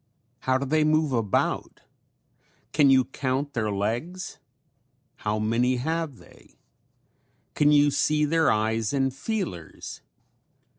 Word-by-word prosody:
How 130 Hz, 0 st, +1 dB
do 140 Hz, -, -3 dB
they 155 Hz, +3 st, +2 dB
move 155 Hz, -1 st, +2 dB
about? 115 Hz, -5 st, -1 dB, 0.9 s
Can 145 Hz, -2 st, +5 dB
you 130 Hz, -1 st, +5 dB
count 135 Hz, +2 st, -2 dB
their 110 Hz, -3 st, -1 dB
legs? 120 Hz, -, -3 dB, 0.8 s
How 105 Hz, 0 st, -2 dB
many 115 Hz, +4 st, +1 dB
have 160 Hz, +1 st, -2 dB
they? -, -, -19 dB, 1.0 s
Can 150 Hz, 0 st, +3 dB
you 145 Hz, 0 st, +5 dB
see 150 Hz, +2 st, +2 dB
their 160 Hz, +1 st, +2 dB
eyes 110 Hz, +1 st, 0 dB
and 135 Hz, -2 st, +1 dB
feelers? 165 Hz, -, -5 dB
135 Hz, 115 wpm, -26 LUFS, 115-150 Hz, 1.0 s, Can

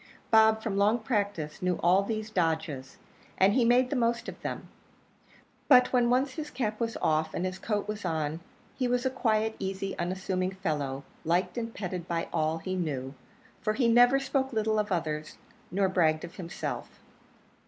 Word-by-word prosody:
Bob, 220 Hz, 0 st, +5 dB
from 195 Hz, -, -2 dB
long 210 Hz, +3 st, +4 dB
practice, 200 Hz, -, -2 dB
knew 180 Hz, -1 st, 0 dB
all 180 Hz, +3 st, +5 dB
these 215 Hz, +1 st, -3 dB
dodges, 160 Hz, -7 st, -1 dB, 0.4 s
and 195 Hz, +2 st, +5 dB
he 255 Hz, -, +3 dB
made 250 Hz, +2 st, +4 dB
the -, -, 0 dB
most 235 Hz, -1 st, 0 dB
of -, -, -8 dB
them. -, -, -5 dB, 1.0 s
But 250 Hz, -2 st, +6 dB
when 245 Hz, -1 st, +4 dB
once 260 Hz, +2 st, +2 dB
his 300 Hz, 0 st, -5 dB
cap 220 Hz, -6 st, -2 dB
was 230 Hz, -1 st, -2 dB
off, 155 Hz, 0 st, +1 dB
and 180 Hz, -, -1 dB
his 185 Hz, 0 st, -4 dB
coat 210 Hz, -1 st, -2 dB
was 210 Hz, 0 st, -4 dB
on, 155 Hz, -1 st, -1 dB, 0.4 s
he 255 Hz, -, 0 dB
was 245 Hz, +1 st, 0 dB
a 260 Hz, -, +2 dB
quiet, 220 Hz, -4 st, +1 dB
easy, 195 Hz, 0 st, -3 dB
unassuming 185 Hz, +1 st, -1 dB
fellow 145 Hz, -7 st, -2 dB, 0.2 s
liked 180 Hz, +2 st, +1 dB
and 230 Hz, -1 st, -3 dB
petted 180 Hz, -5 st, -5 dB
by 170 Hz, -1 st, -2 dB
all 155 Hz, +1 st, +1 dB
he 185 Hz, +3 st, -4 dB
knew; 140 Hz, -7 st, -3 dB, 0.5 s
for 215 Hz, -, 0 dB
he 240 Hz, +1 st, +2 dB
never 245 Hz, +3 st, +6 dB
spoke 270 Hz, 0 st, -1 dB
little 220 Hz, -1 st, +1 dB
of 210 Hz, -1 st, -2 dB
others 155 Hz, -3 st, -2 dB, 0.3 s
nor 195 Hz, +1 st, +1 dB
bragged 160 Hz, -4 st, +2 dB
of 175 Hz, +1 st, -9 dB
himself. 175 Hz, 0 st, -5 dB
200 Hz, 175 wpm, -29 LUFS, 170-230 Hz, 1.0 s, But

